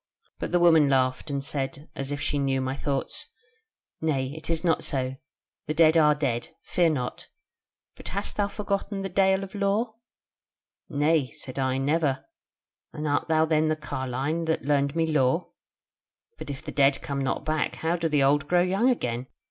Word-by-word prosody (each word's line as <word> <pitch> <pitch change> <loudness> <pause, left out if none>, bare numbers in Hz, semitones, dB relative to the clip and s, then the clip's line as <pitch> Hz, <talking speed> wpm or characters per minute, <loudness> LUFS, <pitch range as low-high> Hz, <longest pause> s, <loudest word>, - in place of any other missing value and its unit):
But - - -4
the 180 - +4
woman 160 -4 +6
laughed, 130 +2 +1
and 140 -1 -2
said, 140 0 -3
as 135 +1 -4
if 145 - -2
she 145 - 0
knew 135 -1 +1
my 130 0 -2
thoughts: 140 -1 -3 0.7
'Nay, 135 -4 0
it 160 - -9
is 165 -1 0
not 165 -2 +2
so: 130 -2 -2 0.5
the 155 - -2
dead 160 0 +5
are 150 -2 +5
dead; 130 -5 -1 0.2
fear 175 -2 +2
not: 125 -6 -3 0.7
but - - -11
hast 200 +2 -2
thou 205 -1 +1
forgotten 200 -1 -3
the 195 - -3
Dale 190 +1 +3
of 195 - -9
Lore?' 205 +3 0 1.0
"'Nay,' 145 -1 +2
said 130 +1 -7
I, 130 -1 +1
'never; 145 0 0 0.7
and 155 0 -4
art 145 +2 0
thou 160 0 +3
then 155 0 +2
the 155 - +2
carline 140 +2 -3
that 160 -4 -1
learned 140 0 +1
me 165 -1 +2
lore? 155 +1 +1 0.9
But - - -7
if 140 -2 -6
the - - -5
dead 140 -1 +3
come 140 -1 -3
not 135 - -2
back, 155 0 0
how 165 +2 0
do 165 -2 -1
the 145 -2 +3
old 140 +1 +3
grow 175 +1 +4
young 195 +7 +2
again? 125 - -1
150 Hz, 180 wpm, -26 LUFS, 135-165 Hz, 1.0 s, woman